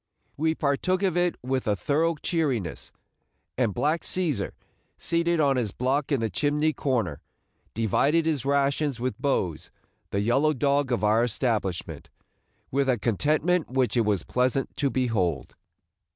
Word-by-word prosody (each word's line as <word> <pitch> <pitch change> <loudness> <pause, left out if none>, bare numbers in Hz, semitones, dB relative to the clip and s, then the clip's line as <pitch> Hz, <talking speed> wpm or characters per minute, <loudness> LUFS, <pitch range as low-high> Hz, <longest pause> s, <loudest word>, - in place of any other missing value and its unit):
We 160 +2 0
partook 165 +7 0
of 185 -4 +1
it 175 -1 +1
with 130 -1 -2
a 105 - +2
thorough 155 - +1
cheeriness; 145 - -2 0.6
and 120 -4 +1
black 150 - 0
Cæsar, 155 - -1 0.4
seated 170 0 +1
on 140 -3 +3
his 115 -5 -1
block 135 +6 -1
in 135 -5 +2
the 110 - 0
chimney 150 +6 +1
corner, 110 - -1 0.5
divided 140 - +2
his 150 -6 0
rations 140 -1 +1
with 130 +1 -3
Bose, 95 - -1 0.4
the 100 - -1
yellow 135 +8 +2
dog 140 0 +1
of 120 - 0
our 110 +2 +4
establishment, 110 -6 -2 0.6
with 135 0 +1
a 125 - +3
contentment 150 - +1
which 130 -1 0
it 120 - +4
was 105 -5 0
pleasant 130 +2 0
to 140 - +1
behold. 105 - -1
135 Hz, 145 wpm, -26 LUFS, 115-155 Hz, 0.6 s, our